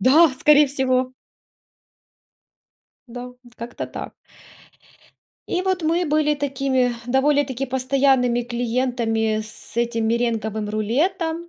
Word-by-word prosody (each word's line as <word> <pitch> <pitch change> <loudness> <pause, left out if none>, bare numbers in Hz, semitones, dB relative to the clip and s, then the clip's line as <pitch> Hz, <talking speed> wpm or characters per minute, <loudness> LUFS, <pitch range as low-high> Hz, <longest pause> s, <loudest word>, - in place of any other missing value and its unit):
Да, 300 - +6
скорее 300 0 +6
всего. 255 -2 0 2.0
Да, 245 +1 -8 0.2
как-то 235 +1 -6
так. - - -8 1.3
И 360 - 0
вот 375 -2 -1
мы 335 +3 +1
были 300 0 +2
такими 270 -3 0
довольно-таки 270 0 +1
постоянными 260 -1 +2
клиентами 235 -2 -1
с 215 +1 -10
этим 235 -1 0
меренговым 220 -2 -1
рулетом, 325 - -1
255 Hz, 95 wpm, -22 LUFS, 235-290 Hz, 2.0 s, Да